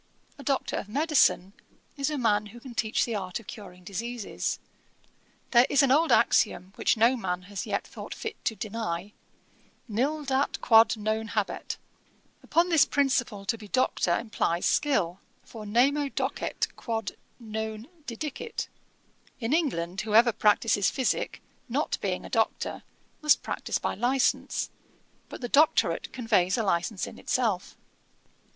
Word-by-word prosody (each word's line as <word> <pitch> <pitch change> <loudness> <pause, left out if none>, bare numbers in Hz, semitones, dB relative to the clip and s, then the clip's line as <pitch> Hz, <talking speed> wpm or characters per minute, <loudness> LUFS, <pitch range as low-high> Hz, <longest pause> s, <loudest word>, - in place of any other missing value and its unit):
A - - -8
Doctor 275 0 0
of 200 - -5
Medicine 275 - +3 0.4
is 275 -1 -1
a 300 - -2
man 210 -4 +2
who 235 +4 -12
can 250 0 -10
teach 220 -1 +1
the 235 - -3
art 185 -2 -3
of 230 - -15
curing 190 -4 -10
diseases. 230 +4 -3 0.9
There 240 0 +6
is 280 0 +4
an 270 - +3
old 320 +4 +4
axiom 185 +2 +3
which - - +2
no 230 +4 +5
man 180 -6 -3
has 200 0 -6
yet - - -1
thought - - -8
fit 445 0 -6
to 220 - 0
deny, 205 -3 -4 0.7
Nil 275 +8 -1
dat 270 +1 0
quod 225 0 +5
non 220 +1 -1
habet. 210 -2 -2 0.6
Upon 340 +2 +2
this 320 -5 +6
principle 255 -8 0
to 230 +3 -1
be 210 - -10
Doctor 195 -7 +1
implies 195 -6 -1
skill, 195 - +1 0.2
for 215 -3 -9
nemo 275 +6 +3
docet - - -2
quod 225 -2 -3 0.3
non 220 0 -5 0.2
didicit. 300 - -5 0.7
In 235 +2 -1
England, 195 - 0
whoever 225 +2 +5
practises 210 -1 +3
physick, 260 -2 -1 0.3
not - - -1
being - - -2
a - - -6
Doctor, - - 0 0.4
must 300 -1 +4
practise - - -2
by - - -2
a - - -9
licence: 250 +4 +1 0.6
but - - -9
the 245 - -2
doctorate 295 +5 +3
conveys 210 -7 +2
a 230 - +1
licence 185 +1 0
in - - -10
itself. 220 -8 -1
225 Hz, 145 wpm, -28 LUFS, 205-265 Hz, 0.9 s, There